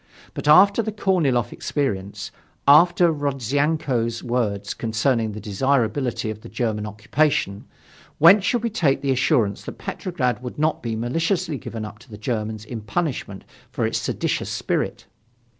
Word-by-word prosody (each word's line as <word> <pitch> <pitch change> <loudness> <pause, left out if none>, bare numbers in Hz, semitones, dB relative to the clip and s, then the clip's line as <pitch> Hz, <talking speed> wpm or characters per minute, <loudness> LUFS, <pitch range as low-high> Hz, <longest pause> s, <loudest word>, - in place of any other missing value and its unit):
But - - -5
after 200 +8 +7
the 220 -1 -3
Korniloff 165 - +1
experience, 100 -9 -3 0.4
after 170 +3 +6
Rodzyanko's 140 -3 -1
words 105 -5 -1
concerning 115 0 0
the 105 - -6
desirability 120 +1 0
of 110 0 -9
the 115 - -11
German 110 -3 -2
occupation, 105 -1 0 0.5
whence 185 +6 +7
should 235 +3 0
we 230 - -1
take 145 -10 +1
the 140 - +1
assurance 125 - +1
that - - -7
Petrograd 130 -10 -2
would 125 -1 -7
not 155 +1 0
be 115 -2 -3
maliciously 165 - -1
given 115 -4 -6
up 105 0 -10
to 120 +2 -18
the 105 - -9
Germans 110 -1 -3
in 115 0 -6
punishment 105 - -3 0.3
for - - -1
its - - 0
seditious - - -2
spirit? - - -2
125 Hz, 145 wpm, -23 LUFS, 110-155 Hz, 0.5 s, after